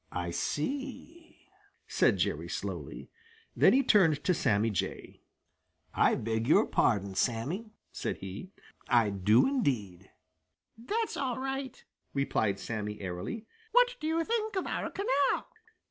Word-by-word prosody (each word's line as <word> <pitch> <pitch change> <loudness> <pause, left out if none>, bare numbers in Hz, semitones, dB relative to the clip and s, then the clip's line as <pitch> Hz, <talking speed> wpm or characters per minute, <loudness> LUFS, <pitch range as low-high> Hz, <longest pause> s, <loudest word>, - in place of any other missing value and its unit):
"I 90 -1 -3
see," 285 - -4 0.4
said - - +3
Jerry - - -1
slowly. - - -5 0.4
Then - - +6
he 270 +2 +4
turned 165 - +4
to 180 - +3
Sammy 115 -8 +1
Jay. 100 - -4 0.7
"I - - +4
beg 110 +1 -2
your 150 - +5
pardon, 100 -3 +1
Sammy," 130 - -1 0.2
said - - -3
he. 95 - -8 0.4
"I 115 -4 +4
do, 100 +4 +4
indeed." 110 - -1 0.7
"That's 420 - -2
all 255 -4 -1
right," 270 0 -4 0.3
replied 110 -7 0
Sammy 105 -2 -4
airily. 95 - -5 0.3
"What - - +5
do 310 - -3
you 325 +1 +1
think 435 0 -1
of 380 - -1
our - - -2
canal?" 285 -8 +1
150 Hz, 130 wpm, -30 LUFS, -, 0.7 s, Then